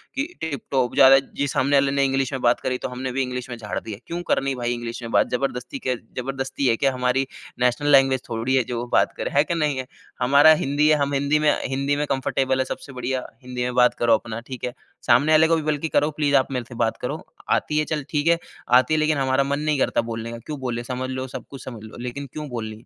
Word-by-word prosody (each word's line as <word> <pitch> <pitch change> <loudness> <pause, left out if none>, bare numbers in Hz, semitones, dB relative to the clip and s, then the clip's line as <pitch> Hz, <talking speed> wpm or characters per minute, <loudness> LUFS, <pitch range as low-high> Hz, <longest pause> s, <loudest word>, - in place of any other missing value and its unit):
कि 275 - 0 0.2
टिप-टॉप 135 -4 -1
ज़्यादा 135 0 +8
जी 140 +1 -4
सामने 140 +3 +1
वाले 135 0 +3
ने 140 0 +2
इंग्लिश 135 -1 0
में 130 - -3
बात 120 0 +3
करी 125 -1 -2
तो - - -3
हमने 130 +1 -4
भी 135 +2 -1
इंग्लिश 125 -1 -4
में 120 - -4
झाड़ 105 -3 -4
दिया 110 - -7
है। 100 - -18
क्यों 170 +1 -4
करनी 135 0 +1
भई 120 -1 -1
इंग्लिश 120 0 -5
में 115 - -6
बात - - +3
ज़बरदस्ती 125 -1 -3
के 130 -1 -1 0.2
ज़बरदस्ती 135 +1 -2
है 115 - +4
क्या 135 +2 +1
हमारी 125 +1 0 0.3
नेशनल 125 +4 +2
लैंग्वेज 135 -2 +5
थोड़ी 115 +3 0
है 130 - +3
जो 120 0 -2
बात - - +4
करें। - - -3
है 145 - +6
कि 170 - -2
नहीं 150 -4 0
है। 130 -1 -4 0.3
हमारा 140 +5 +7
हिंदी 145 +2 +2
है 155 - +6
हम 140 0 0
हिंदी 140 +2 +2
में 150 -1 +4 0.2
हिंदी 140 +2 0
में 145 +1 -1
कंफ़र्टेबल 135 0 0
हैं 130 - +1
सबसे 135 +1 -7
बढ़िया, 130 0 -3 0.2
हिंदी 125 0 -4
में 125 0 -2
बात 125 0 +5
करो 120 - +4
अपना 115 -1 -5
ठीक 130 - -7
है? 125 - -4 0.3
सामने 155 +2 +5
वाले 155 +1 +6
को 165 - +3
भी 160 - -1
बल्कि 150 +2 -2
करो 150 - +2
प्लीज़ 145 -1 +1
आप 130 0 +3
मेरे 125 -2 -2
से 125 - -9
बात 110 - -2
करो। - - -4 0.3
आती 150 - +1
है 155 - +1
चल 150 -2 -2
ठीक 150 0 0
है, 170 0 +4 0.3
आती 125 +4 +5
है 155 - +3
लेकिन 155 -1 +2
हमारा 135 0 +2
मन 140 +1 -1
नहीं 150 -1 0
करता - - +2
बोलने 115 0 -5
का, 115 - -6
क्यों 150 -2 -5
बोले 120 -2 -3
समझ 125 +1 -4
लो 130 0 -4
सब - - -12
कुछ 135 - -9
समझ 115 -4 -8
लो 110 - -11
लेकिन 140 +3 -5
क्यों 150 -2 -6
बोलनी? 110 -2 -6
130 Hz, 255 wpm, -23 LUFS, 125-145 Hz, 0.3 s, ज़्यादा